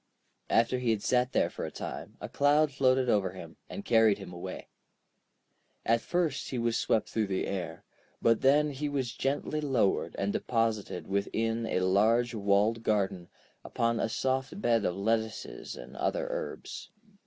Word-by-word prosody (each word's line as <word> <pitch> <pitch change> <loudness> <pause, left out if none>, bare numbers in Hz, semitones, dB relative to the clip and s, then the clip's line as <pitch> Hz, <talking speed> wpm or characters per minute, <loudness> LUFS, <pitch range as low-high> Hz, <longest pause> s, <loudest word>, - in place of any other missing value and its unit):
After 115 +2 +3
he 125 -2 -1
had 110 -2 +1
sat 125 0 +2
there - - +2
for - - -6
a - - -3
time, - - -7
a - - -5
cloud 145 +1 +3
floated 130 -1 +2
over 100 -5 +2
him, 85 -3 -10
and 200 - -7
carried 110 -3 +5
him 95 -3 -9
away. 85 - -7 1.2
At 115 +1 +3
first 170 -3 -1
he 130 - -3
was 115 -1 0
swept 110 - +1
through 110 -2 -1
the 95 -1 -1
air, 85 -4 -4 0.4
but 115 -1 +3
then 145 +3 +4
he 145 +2 -3
was 130 -4 -2
gently 145 +3 -1
lowered 130 -9 +1
and 100 +1 -1
deposited 115 -5 -1
within 115 +3 -1
a 90 - 0
large 110 +6 +3
walled 105 +2 +2
garden, 95 -5 0 0.3
upon 115 0 0
a - - 0
soft 130 - -1
bed 115 - +2
of 90 - 0
lettuces 110 +2 -2
and - - -10
other - - -1
herbs. - - -5
115 Hz, 165 wpm, -30 LUFS, 100-130 Hz, 1.2 s, carried